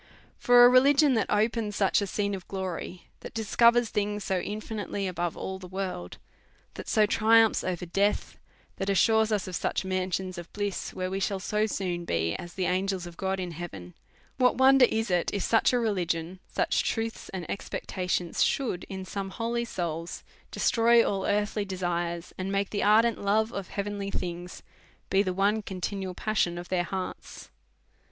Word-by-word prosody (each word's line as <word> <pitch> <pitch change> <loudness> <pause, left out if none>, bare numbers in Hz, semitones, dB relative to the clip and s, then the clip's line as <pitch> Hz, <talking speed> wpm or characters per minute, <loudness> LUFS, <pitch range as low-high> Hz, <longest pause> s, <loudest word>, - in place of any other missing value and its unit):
For 245 0 +7
a - - +10
religion 275 +3 +5
that 225 - 0
opens 215 0 0
such 195 0 +2
a 200 - -2
scene 200 +1 -1
of 190 -2 -6
glory, 185 -2 -5 0.2
that - - -10
discovers 235 +2 +4
things 210 0 -2
so 190 -2 0
infinitely 210 0 -4
above 175 -2 -3
all 190 0 -5
the 185 - -9
worlds 185 - -5 0.6
that - - -8
so 215 - +4
triumphs 225 +1 +4
over 180 -1 -3
death, 200 +4 0 0.4
that 195 - -2
assures 220 +3 +3
us 205 -3 0
of 185 - -5
such - - -1
mansions 185 -1 -2
of 170 - -10
bliss, 205 -2 -3
where 185 0 -3
we 195 - -2
shall 195 0 -1
so 210 +2 0
soon 180 -4 -3
be 85 - 0
as 175 - -9
the 185 - -1
angels 185 0 -1
of 175 -1 -10
God 190 +2 -2
in 180 -2 -4
heaven; 150 - -8 0.4
what 250 -1 +4
wonder 265 -1 +7
is 220 -2 -1
it, 175 -1 +1
if 200 - -1
such 225 - +3
a 250 - +2
religion, 180 -6 -1
such - - 0
truths 225 0 -3
and 185 -3 -6
expectations, 180 -3 -3
should, 235 -10 -1
in 190 -1 -6
some 195 +1 -4
holy 235 +4 -2
souls, 170 -5 -4 0.3
destroy 235 0 +4
all 195 -1 -1
earthly 210 +1 0
desires, 175 -3 -3
and 190 +1 -2
make 200 0 -1
the 205 - -1
ardent 225 +2 +4
love 220 +3 +2
of 195 -2 -4
heavenly 200 0 -4
things 175 -1 -5 0.5
be 195 +1 +4
the 190 -2 -1
one 200 +4 +1
conti 190 0 -4
nual 190 -2 -5
passion 190 -5 0
of 175 0 -7
their 180 -1 0
hearts 190 +1 -6
195 Hz, 175 wpm, -28 LUFS, 180-215 Hz, 0.6 s, a